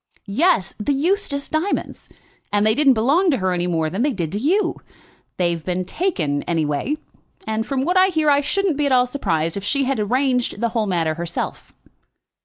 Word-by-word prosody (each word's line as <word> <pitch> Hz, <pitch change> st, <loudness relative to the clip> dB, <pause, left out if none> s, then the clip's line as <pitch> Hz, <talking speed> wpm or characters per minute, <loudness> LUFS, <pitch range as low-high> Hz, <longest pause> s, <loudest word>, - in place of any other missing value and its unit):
"Yes, 215 Hz, -, +1 dB
the 215 Hz, +7 st, 0 dB
Eustace 290 Hz, -1 st, 0 dB
diamonds! 320 Hz, +6 st, -2 dB, 0.4 s
And 205 Hz, 0 st, +2 dB
they 215 Hz, -, +4 dB
didn't 275 Hz, 0 st, +4 dB
belong 285 Hz, -, +3 dB
to 275 Hz, -, +2 dB
her 185 Hz, -3 st, 0 dB
any 175 Hz, 0 st, -1 dB
more 165 Hz, -2 st, 0 dB
than 190 Hz, +8 st, -3 dB
they 290 Hz, -, +2 dB
did 170 Hz, -6 st, -3 dB
to 205 Hz, -, -2 dB
you. 360 Hz, -, +1 dB, 0.6 s
They've 170 Hz, -3 st, 0 dB
been 180 Hz, +1 st, -2 dB
taken, 175 Hz, -, -1 dB
anyway; 160 Hz, -, -1 dB, 0.5 s
and 220 Hz, +1 st, -2 dB
from 270 Hz, -1 st, -1 dB
what 360 Hz, +3 st, +1 dB
I 370 Hz, +1 st, +6 dB
hear 315 Hz, -5 st, 0 dB
I 285 Hz, 0 st, +4 dB
shouldn't 355 Hz, +2 st, 0 dB
be 295 Hz, -1 st, +1 dB
at -, -, -1 dB
all 250 Hz, -1 st, +5 dB
surprised 165 Hz, -, -1 dB
if 200 Hz, -, -5 dB
she 275 Hz, +7 st, +1 dB
had 270 Hz, -2 st, -1 dB
arranged 250 Hz, +1 st, 0 dB
the 235 Hz, +1 st, 0 dB
whole 225 Hz, -2 st, -1 dB
matter 165 Hz, -4 st, 0 dB
herself." 170 Hz, +1 st, -5 dB
240 Hz, 195 wpm, -21 LUFS, 180-290 Hz, 0.6 s, I